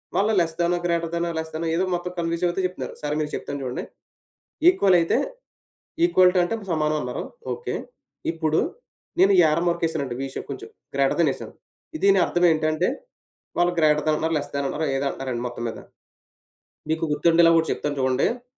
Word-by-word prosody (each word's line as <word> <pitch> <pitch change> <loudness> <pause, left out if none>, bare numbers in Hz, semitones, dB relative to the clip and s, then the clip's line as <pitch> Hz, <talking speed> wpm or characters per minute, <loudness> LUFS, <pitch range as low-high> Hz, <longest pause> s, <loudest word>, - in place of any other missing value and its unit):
వాళ్ళు 210 +3 +2
less than, 170 +1 0
greater than, 170 0 0
less than 160 +1 -4
ఏదో 185 - +1
మొత్తం 175 +1 -4
కన్‌ఫ్యూ‌జ్ 170 +1 -1
అవుతూ 175 +2 -1
చెప్తున్నారు. 180 - -7
సరే 150 0 -2
మీకు 150 -1 -2
చెప్తాను 140 -1 -5
చూడండి. 125 -1 -3 0.9
ఈక్వల్ 200 - +4
అయితే 165 - +1 0.9
ఈక్వల్ 185 - +5
టూ - - +5
అంటే 175 - -1 0.2
సమానం 155 -1 +1
అన్నారు. 125 0 -4 0.3
ఓకే. 470 - -5 0.6
ఇప్పుడు 160 -1 0 0.6
నేను 195 +2 +6
యారో 155 +1 +3
మార్క్ 170 0 0
యేసానండి 140 -7 -2
వి 135 - -2
షేప్ - - -6
కొంచెం 415 +3 -7 0.3
గ్రేటర్‌దాన్ - - +3
యేసాను. - - -8 0.5
దీని 195 -1 +6
అర్థం 175 0 0
ఏంటంటే, 155 +2 +1 0.7
వాళ్ళు 175 0 +3
గ్రేటర్‌దాన్ 155 0 +3
అంటున్నారు, 160 +1 0
లెస్‌దాన్ 140 -1 -3
అన్నారు 155 +1 -2
ఏదో 135 - -1
అంటున్నారండి 130 -3 -4
మొత్తం 120 -1 -6
మీద. - - -7 1.1
మీకు 160 +1 0
గుర్తుండేలాగా 165 +1 +5
ఓటి - - -5
చెప్తాను 145 -1 -3
చూడండి. 135 - +1
165 Hz, 155 wpm, -24 LUFS, 150-175 Hz, 1.1 s, నేను